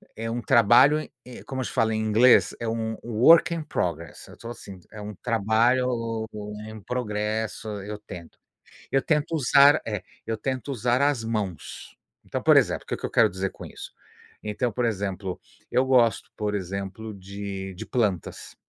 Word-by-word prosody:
é 115 +1 -4
um 120 +1 -3
trabalho 125 +8 +5 0.2
e 125 -1 -11
como 130 -1 -4
eles 125 - -3
falam 110 0 +1
em 110 - -1
inglês, 110 +4 +4
é 115 - -3
um 110 0 -2
work 125 +10 +5
in 165 - -3
progress. 85 - -4
Eu - - -14
tô 115 - -9
assim, 100 -5 -10
é 110 - -9
um 105 +1 -6
trabalho 115 +2 +1 0.4
em 110 0 -9
progresso. 110 -1 -3 0.2
Eu 105 +1 -6
tento. 90 -5 -11 0.5
Eu 135 - +3
tento 150 +2 0
usar 140 +1 +5
É. 105 -3 -4 0.2
Eu 115 0 -2
tento 130 +3 -3
usar 125 0 +1
as 140 -5 +2
mãos. 105 -7 -5 0.3
Então, - - -5
por - - +6
exemplo, - - +2
o - - -35
que - - -2
que - - -5
eu - - -3
quero 110 -2 +4
dizer 95 0 -3
com - - -11
isso? - - -10 0.5
Então, 110 +3 -2
por 120 +3 -1
exemplo, 95 -3 -3 0.3
eu 130 - +3
gosto, 120 -5 +3
por 105 -1 -2
exemplo, 100 +3 -5
de 100 0 -7
de 90 - -8
plantas. 105 -9 -2
110 Hz, 175 wpm, -25 LUFS, 100-125 Hz, 0.5 s, por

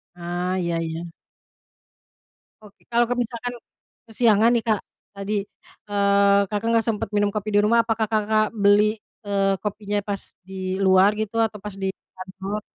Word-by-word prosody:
Ah, 175 +1 -3
iya 170 -1 -1
iya. 165 +1 -5 1.5
Oke, 210 -1 -18
kalau 235 0 +3
misalkan 245 0 -3 0.5
kesiangan 225 -1 +4
nih 235 - +1
Kak 215 -2 +2 0.3
tadi, 200 +1 -4 0.6
eee, 200 0 +4
Kakak 210 +2 -2
nggak 230 -1 +2
sempet 215 -3 -2
minum 205 0 +3
kopi 210 0 -3
di 205 - +5
rumah, 230 +2 +4
apakah 225 -1 0
Kakak 215 0 +1
beli, 210 +1 +3 0.3
eee, 195 -1 +1
kopinya 210 0 -3
pas 200 -2 -3 0.3
di 190 0 -4
luar 190 0 +5
gitu 220 +1 -3
atau 220 -1 0
pas 210 -2 -6
di 195 0 -3 0.3
kantor? 195 +2 -6
205 Hz, 145 wpm, -23 LUFS, 195-220 Hz, 1.5 s, di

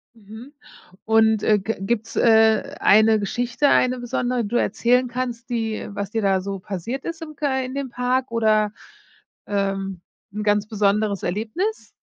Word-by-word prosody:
Mhm, 220 +5 -12 0.5
und, 220 -1 +3
äh, 210 -1 +3
g 220 +4 -3
gibt’s, 225 +2 -2
äh, 225 +4 +4
eine 220 +1 +5
Geschichte, 240 +6 0
eine 255 0 +3
besondere, 245 0 -1
die - - -4
du 235 - -4
erzählen 245 +4 +2
kannst, 245 -1 -5
die 225 -2 -2
was 200 -1 -4
dir 225 0 -2
da 195 -1 +2
so 195 +1 -4
passiert 210 +8 -5
ist 335 -1 -5
im 310 -2 -8
kei 270 -3 -1
in 255 +1 -7
dem 280 -1 -3
Park 250 +1 -1
oder, 215 -2 +2 0.7
ähm, 195 -2 -2 0.3
’n 210 +1 -4
ganz 210 0 +1
besonderes 210 -1 0
Erlebnis? 225 - -3
225 Hz, 160 wpm, -22 LUFS, 205-250 Hz, 0.7 s, eine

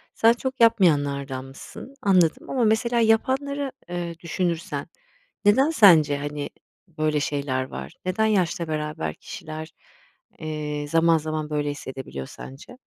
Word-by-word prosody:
Sen 230 +1 +5
çok 260 +1 -4
yapmayanlardanmışsın. 145 - +1
Anladım 185 -7 +2
ama 255 -3 +1
mesela 230 +2 +2
yapanları, 265 +5 +1 0.2
eee, 170 -1 -4
düşünürsen 170 0 -2 0.6
neden 265 +9 +5
sence, 160 - +6
hani, 145 0 -4 0.4
böyle 155 -2 0
şeyler 140 -3 -1
var? 65 - -8
Neden 190 +4 +1
yaşla 180 -5 +1
beraber 150 - -3
kişiler, 155 0 -8 0.7
eee, 150 -1 -4
zaman 165 +1 +4
zaman 155 0 -3
böyle 145 -1 -1
hissedebiliyor 130 - -7
sence? 145 - -11
160 Hz, 115 wpm, -24 LUFS, 145-215 Hz, 0.7 s, sence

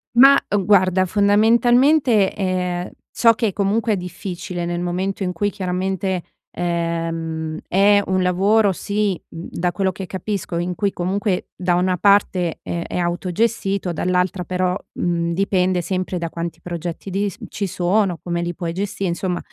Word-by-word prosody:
Ma, 275 +3 +8 0.2
uhm, 195 - 0
guarda 185 -1 +4
fondamentalmente, 230 - +4
ehm, 180 -2 -2 0.2
ciò 230 -1 +5
che 220 -4 0
comunque 210 +3 +1
è - - 0
difficile, 180 -1 -5
nel 175 0 -2
momento 185 +3 -2
in 180 - -2
cui 205 +4 0
chiaramente, 190 -1 -2 0.3
ehm, 165 -2 -2
è 200 +2 +4
un 185 0 +1
lavoro 200 +3 +3
sì, 200 0 -1
mhmm, 165 +1 -8
da 175 +1 -1
quello 190 +1 0
che 185 +1 -7
capisco, 190 -1 -4
in 175 +1 -1
cui 200 +3 0
comunque, 190 +1 -1
da 180 -1 0
una 180 +1 +1
parte 190 -3 +2
è - - -3
è - - -3
autogestito, 185 +2 -1
dall'altra 180 +1 0
però, 180 0 0 0.2
mhmm, 170 -1 -1
dipende 185 -1 +1
sempre 185 0 -2
da 170 -1 -3
quanti 170 0 -5
progetti 175 +2 -6
di 200 +1 0 0.2
ci 200 -1 -3
sono, 180 0 +1
come 170 -1 -2
li 175 -1 -3
puoi 170 -2 -4
gestire, 195 0 -2
insomma, 175 +1 -2
185 Hz, 155 wpm, -21 LUFS, 175-200 Hz, 0.3 s, Ma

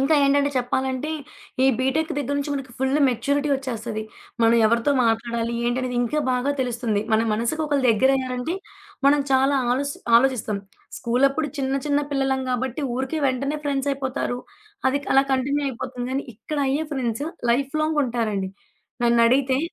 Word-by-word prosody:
ఇంకా 275 +4 +3
ఏంటంటే 280 +1 +3
చెప్పాలంటే 260 +3 -1 0.5
ఈ - - +6
బీటెక్ 290 +5 0
దగ్గర 285 0 -1
నుంచి 285 +1 -3
మనకి 270 -3 -5
ఫుల్ 265 +2 +1
మెచ్యూరిటీ 280 +5 0
ఒచ్చేస్తది. 235 -5 -4 0.4
మనం 230 0 +5
ఎవరితో 235 +5 +2
మాట్లాడాలి? 230 +1 0
ఏంటనేది 250 0 -1
ఇంకా 245 +6 -1
బాగా 250 +3 0
తెలుస్తుంది. 235 -4 -1
మన 220 - +4
మనసుకి 235 +9 -1
ఒకళ్ళు 285 -3 +1
దగ్గరయ్యారంటే 260 - +1 0.5
మనం 290 +1 +5
చాలా 270 +1 +4 0.2
ఆలోస్ 280 +3 0 0.2
ఆలోచిస్తాం. 235 -5 +1 0.4
స్కూలప్పుడు 275 +5 +1
చిన్న 270 0 0
చిన్న 290 0 +2
పిల్లలం 270 -1 0
గాబట్టి, 255 +3 -2
ఊరికే 265 +4 -2
వెంటనే 275 +3 -1
ఫ్రెండ్సయిపోతారు. 275 -3 -1 0.5
అది 280 +2 0
క్ - - -17
అలా 270 - +7
కంటిన్యూ 280 +2 +1
అయిపోతుంది. 245 0 -5
కానీ 275 - -1
ఇక్కడ 300 +7 -5
అయ్యే 295 +4 0
ఫ్రెండ్స్ 250 -1 -2 0.3
లైఫ్‌లాంగ్ 300 +5 0
ఉంటారండి. 215 -6 -2 0.5
నన్నడిగితే 245 +3 +4
265 Hz, 140 wpm, -23 LUFS, 240-280 Hz, 0.5 s, అలా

